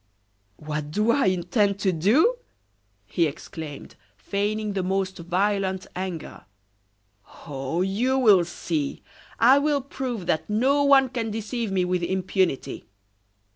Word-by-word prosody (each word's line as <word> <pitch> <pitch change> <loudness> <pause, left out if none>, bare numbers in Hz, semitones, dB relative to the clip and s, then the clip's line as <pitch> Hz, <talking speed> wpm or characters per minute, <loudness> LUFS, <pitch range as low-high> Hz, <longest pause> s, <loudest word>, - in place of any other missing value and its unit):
"What 150 -1 -4
do 210 +8 +2
I 275 -4 +2
intend 190 +3 +1
to 190 - +2
do?" 235 - +3 0.7
he 170 -3 +1
exclaimed, 150 0 -8 0.2
feigning 205 - -2
the 195 - -1
most 190 0 -2
violent 190 +2 0
anger. 180 -3 -6 1.0
"Oh! 145 +3 -2
you 235 +8 +1
will 210 -8 +6
see. 160 -4 -3 0.4
I 255 +5 +6
will 290 0 +1
prove 255 -6 -5
that 160 +1 -1
no 265 +7 +2
one 275 -1 +6
can 235 -3 -3
deceive 220 +1 -3
me 185 -2 +1
with 180 0 0
impunity. 185 -5 -1
195 Hz, 125 wpm, -25 LUFS, 175-230 Hz, 1.0 s, will